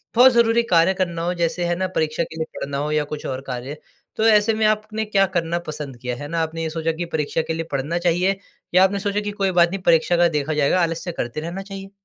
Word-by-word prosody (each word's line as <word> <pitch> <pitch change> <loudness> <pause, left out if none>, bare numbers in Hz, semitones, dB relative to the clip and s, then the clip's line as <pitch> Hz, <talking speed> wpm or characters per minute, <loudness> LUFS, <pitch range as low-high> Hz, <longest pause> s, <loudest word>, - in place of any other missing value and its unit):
बहुत 255 +2 +8
ज़रूरी 235 0 +3
कार्य 170 +2 +4
करना 175 -3 -2
हो। 175 +1 0
जैसे 175 0 -1
है 175 0 0
ना 185 +1 -1
परीक्षा 155 +1 0
के 160 - -9
लिए 160 - -1
पढ़ना 140 0 -3
हो 150 +2 -2
या 150 -1 +2
कुछ 150 - -6
और 130 0 -3
कार्य, 130 +4 -5 0.4
तो 220 - 0
ऐसे 215 0 +5
में 220 0 +1
आपने 215 +1 -1
क्या 195 -2 +3
करना 170 +1 -1
पसंद 145 -4 -6
किया, 125 0 -4
है 145 +4 -7
ना? 165 +1 -1
आपने 165 0 -3
ये 160 - -2
सोचा 165 0 -1
कि 170 +2 -4
परीक्षा 155 +1 0
के 160 - -3
लिए 165 0 -3
पढ़ना 145 +5 -1
चाहिए? 180 +3 +1 0.3
या 185 +1 +6
आपने 200 +1 +2
सोचा 205 +1 -1
कि 205 0 -3
कोई 195 -2 0
बात 175 -1 +4
नहीं 195 +1 -4
परीक्षा 170 +1 +4
का 175 0 +5
देखा 150 +2 -1
जाएगा, 150 +5 +2
आलस्य 165 +1 -1
करते 120 -2 -4
रहना 170 +4 -5
चाहिए? 195 0 -9
170 Hz, 255 wpm, -22 LUFS, 155-195 Hz, 0.4 s, बहुत